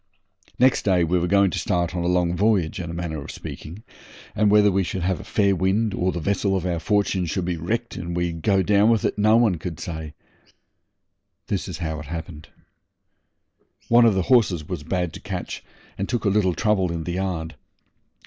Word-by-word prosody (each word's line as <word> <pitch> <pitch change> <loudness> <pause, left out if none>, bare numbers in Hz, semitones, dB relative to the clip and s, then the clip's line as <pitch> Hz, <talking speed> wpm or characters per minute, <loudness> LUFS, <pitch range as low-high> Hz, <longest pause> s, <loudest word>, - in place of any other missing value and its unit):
Next 130 +1 +3
day 90 -3 +3
we 90 +2 +1
were 85 - -1
going 100 0 +3
to - - -2
start 85 0 -1
on 90 - -1
a - - 0
long 90 -1 +1
voyage, 100 -4 +1
in 85 -2 -5
a - - -5
manner 85 -3 -4
of - - -11
speaking, 90 +8 -9 0.5
and 105 -1 +3
whether 105 0 +5
we 95 +1 +1
should 95 0 -4
have 95 0 0
a - - -8
fair 100 -2 +1
wind 95 +4 +1
or 90 +1 0
the 85 - -4
vessel 95 +3 0
of 95 -2 -2
our 85 -2 -1
fortune 100 -1 0
would 95 - -1
be 90 -1 -1
wrecked 115 +9 -3
and 85 0 -5
we 85 0 0
go 95 +4 +1
down 105 +2 +4
with 115 -3 +2
it - - -1
no 110 +2 +5
one 110 -8 +2
could 85 -1 -6
say. 80 -2 -6 1.3
This - - -2
is - - -5
how 80 -3 -4
it 75 - -9
happened. 80 -1 -7 1.4
One 120 0 +6
of 110 -4 +4
the 95 - +1
horses 95 - +2
was - - -4
bad 90 +1 -2
to - - -8
catch, - - -6 0.4
and 100 - -2
took 120 -3 -2
a - - +4
little 95 -3 +2
trouble 100 -5 +1
in 85 -1 -3
the 85 - -4
yard. 90 -4 -3
90 Hz, 210 wpm, -23 LUFS, 85-105 Hz, 1.4 s, One